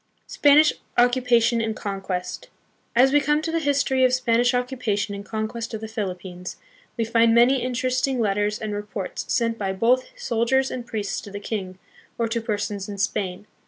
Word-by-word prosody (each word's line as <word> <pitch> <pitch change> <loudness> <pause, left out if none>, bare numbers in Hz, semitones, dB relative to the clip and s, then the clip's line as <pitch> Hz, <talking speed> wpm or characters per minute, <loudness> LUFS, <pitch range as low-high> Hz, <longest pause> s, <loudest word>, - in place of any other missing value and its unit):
Spanish 295 +1 +5 0.2
Occupation 240 -1 +3
and 220 -1 -2
Conquest. 195 -3 -4 0.5
As 260 +3 +5
we 290 +1 +4
come 295 +1 +2
to 325 - -2
the 330 - +1
history 275 -3 +1
of 255 - +5
Spanish 245 0 +2
occupation 245 -5 -1
and 200 0 -6
conquest 220 +2 -4
of 220 - -6
the 220 - -5
Philippines, 185 -4 -5 0.4
we 230 - 0
find 230 0 +3
many 250 +2 +5
interesting 255 +1 0
letters 205 -1 +1
and 215 -2 -4
reports 205 -2 -5
sent 230 -2 0
by 195 -2 -1
both 240 +6 +2
soldiers 265 - +1
and 245 -2 -5
priests 205 -4 -3
to - - -10
the 200 0 -6
king, 195 -3 -5 0.4
or 230 - 0
to 230 +1 -2
persons 205 -2 -3
in 200 - -6
Spain. 195 0 -2
230 Hz, 170 wpm, -24 LUFS, 205-250 Hz, 0.5 s, Spanish